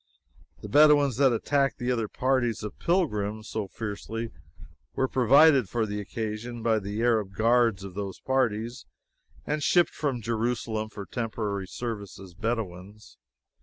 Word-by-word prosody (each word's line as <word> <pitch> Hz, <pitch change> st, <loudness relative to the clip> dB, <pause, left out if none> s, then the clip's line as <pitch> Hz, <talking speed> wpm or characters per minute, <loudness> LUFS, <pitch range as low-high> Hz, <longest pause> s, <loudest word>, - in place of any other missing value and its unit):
The -, -, -5 dB
Bedouins 145 Hz, 0 st, +5 dB
that 135 Hz, -1 st, +5 dB
attacked 135 Hz, +4 st, +1 dB
the 125 Hz, -1 st, -1 dB
other 115 Hz, -3 st, 0 dB
parties 125 Hz, -2 st, 0 dB
of 105 Hz, -, -7 dB
pilgrims 110 Hz, -, 0 dB
so 105 Hz, -3 st, -3 dB
fiercely 110 Hz, +2 st, -5 dB, 0.6 s
were 130 Hz, -, +1 dB
provided 130 Hz, -, +5 dB
for 115 Hz, +4 st, 0 dB
the 105 Hz, -1 st, -4 dB
occasion 110 Hz, +3 st, -5 dB
by 110 Hz, -2 st, +2 dB
the 105 Hz, +3 st, -3 dB
Arab 110 Hz, -5 st, +1 dB
guards 115 Hz, -2 st, +3 dB
of 95 Hz, -2 st, -8 dB
those 100 Hz, -1 st, -5 dB
parties, 120 Hz, -2 st, -1 dB, 0.6 s
and 150 Hz, 0 st, -1 dB
shipped 175 Hz, +3 st, +3 dB
from 140 Hz, -5 st, -2 dB
Jerusalem 115 Hz, -1 st, -2 dB
for 100 Hz, -2 st, -8 dB
temporary 105 Hz, -5 st, -3 dB
service 105 Hz, -4 st, -6 dB
as 95 Hz, -2 st, -11 dB
Bedouins. 105 Hz, -1 st, -5 dB
115 Hz, 140 wpm, -27 LUFS, 105-125 Hz, 0.6 s, Bedouins